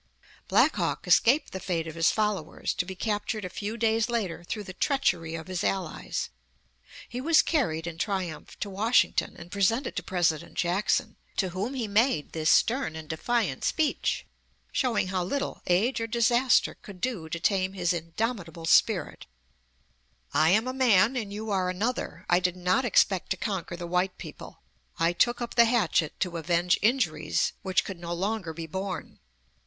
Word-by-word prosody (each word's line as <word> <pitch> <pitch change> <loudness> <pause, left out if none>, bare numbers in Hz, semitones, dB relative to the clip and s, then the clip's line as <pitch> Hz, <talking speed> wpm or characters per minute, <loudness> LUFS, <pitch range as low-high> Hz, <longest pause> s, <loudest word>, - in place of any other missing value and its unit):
Black - - +4
Hawk - - -1
escaped 240 - +4
the 190 - -5
fate 170 -4 -2
of 160 - -6
his 165 +1 +3
followers, 210 -7 -1
to 180 - -2
be 190 - -6
captured 210 0 -2
a - - -4
few 210 +4 -4
days 225 0 +1
later 200 -8 -2
through 210 +4 -4
the 185 - -9
treachery 175 - 0
of 160 -1 -6
his 185 -2 -3
allies. 195 -1 -2 0.8
He 245 - -5
was 320 +3 +5
carried 165 - 0
in 170 -1 -6
triumph 185 -6 -3
to 205 - -2
Washington 220 +5 +2
and 175 0 -11
presented 205 +7 +1
to - - -1
President 170 -3 -1
Jackson, 180 +4 0 0.2
to 190 - +1
whom 200 +9 -3
he 240 -4 -2
made 210 - +2
this 155 -1 0
stern 245 - +3
and 160 -1 -8
defiant 170 - -1
speech, 310 -2 0 0.5
showing 240 -8 0
how 185 -1 -1
little 280 +10 -3
age 220 +8 +2
or 230 - -1
disaster 240 +3 +3
could 195 -3 -13
do 190 -7 -3
to 170 - -3
tame 190 +1 +1
his 180 -2 0
indomitable 170 0 -3
spirit: - - +2 1.1
"I 155 +1 +4
am 220 +7 +3
a 255 - -2
man 235 -3 +4
and 220 -5 -3
you 215 +1 -5
are 185 -2 +1
another. 220 +7 -3
I 175 - +4
did 180 -1 0
not 185 +7 +1
expect 195 -5 +3
to 190 - 0
conquer 190 -4 -3
the 175 - -5
white 180 +2 0
people. - - -10 0.3
I 165 0 +2
took 240 +7 +2
up 235 - -4
the 235 0 +6
hatchet 210 -9 +1
to 180 -2 -1
avenge 175 +2 +1
injuries 250 +5 +1
which 190 -1 +1
could 190 -3 -6
no 170 0 -4
longer 195 -1 -2
be 165 +1 -6
borne. 190 +3 -5
190 Hz, 175 wpm, -27 LUFS, 175-230 Hz, 1.1 s, the